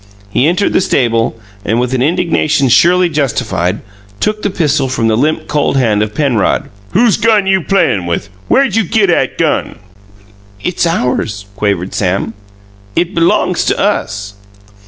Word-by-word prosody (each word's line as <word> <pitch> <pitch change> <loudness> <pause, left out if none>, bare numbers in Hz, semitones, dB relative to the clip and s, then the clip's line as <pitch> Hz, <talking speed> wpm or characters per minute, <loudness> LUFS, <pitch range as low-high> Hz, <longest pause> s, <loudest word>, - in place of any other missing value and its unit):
He 130 - +2
entered 185 +4 +1
the - - +3
stable 115 -8 0 0.2
and, 115 +2 0
with 125 +1 -1
an 130 - 0
indignation 150 -2 +1
surely 175 +8 +4
justified, 120 - -1 0.4
took 215 0 -1
the 205 - 0
pistol 150 -7 0
from 120 -3 0
the 110 - +2
limp, 155 +6 0
cold 145 -2 0
hand 110 -5 +2
of 105 0 -3
Penrod. 130 -8 0 0.2
"Whose 230 +2 +3
gun 215 -2 +2
you 190 -1 +2
playin' 125 - +1
with? 85 +3 -3 0.2
Where 275 - +4
you 225 -4 0
git 200 +1 +2
'at - - 0
gun?" - - -1 0.8
"It's 175 - -1
ours," 125 - -1
quavered 100 -3 -1
Sam. 100 +3 -1 0.6
"It 175 +2 0
belongs 170 -1 +1
to - - +1
us." 100 +1 -1
140 Hz, 155 wpm, -13 LUFS, 110-180 Hz, 0.8 s, surely